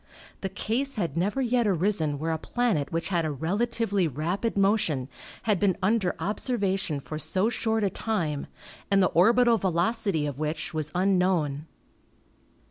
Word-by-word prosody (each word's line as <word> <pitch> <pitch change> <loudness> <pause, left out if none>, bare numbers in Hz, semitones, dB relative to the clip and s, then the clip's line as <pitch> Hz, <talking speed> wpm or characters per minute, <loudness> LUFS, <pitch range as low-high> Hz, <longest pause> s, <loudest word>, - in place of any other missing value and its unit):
The 195 - -3
case 260 +9 -2
had 175 -8 -2
never 205 +10 0
yet 240 -2 +2
arisen 175 -5 +1
where 160 +3 -2
a 160 - -1
planet 220 - -1
which 165 0 -2
had 175 -3 +1
a 155 - -1
relatively 200 - 0
rapid 175 - -2
motion 195 - +1 0.3
had 210 -4 +1
been 195 -3 +2
under 190 -1 +1
observation 195 - 0
for 155 +2 -6
so 195 +7 +1
short 220 -1 0
a 200 - +2
time 165 -10 -2 0.4
and 195 -1 +4
the - - +3
orbital 230 +5 +5
velocity 185 -2 0
of 145 -1 -4
which 155 +1 -3
was 155 -1 -3
unknown. 180 -6 +1
190 Hz, 150 wpm, -27 LUFS, 160-220 Hz, 0.4 s, orbital